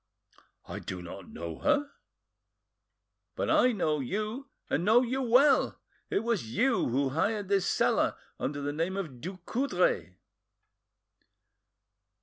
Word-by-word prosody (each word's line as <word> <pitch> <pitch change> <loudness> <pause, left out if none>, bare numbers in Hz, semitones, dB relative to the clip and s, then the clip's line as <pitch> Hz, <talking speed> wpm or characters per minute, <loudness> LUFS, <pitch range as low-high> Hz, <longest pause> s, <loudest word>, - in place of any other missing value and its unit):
"I - - -5
do 90 - -6
not 90 +1 -9
know 85 0 -6
her." 295 -1 +1 1.4
"But - - -1
I 250 - +5
know 155 -9 0
you, 215 - -3 0.2
and - - 0
know 225 +6 +5
you 255 +2 -1
well. 260 +3 +4 0.3
It 205 - 0
was 200 - -2
you 255 +1 +2
who 135 +3 +1
hired 200 +8 -1
this 195 -2 +2
cellar - - +2 0.2
under 145 +1 -2
the 145 +1 -2
name 170 +5 -1
of 145 -11 -5
Ducoudray." 245 - -1
200 Hz, 125 wpm, -29 LUFS, -, 1.4 s, I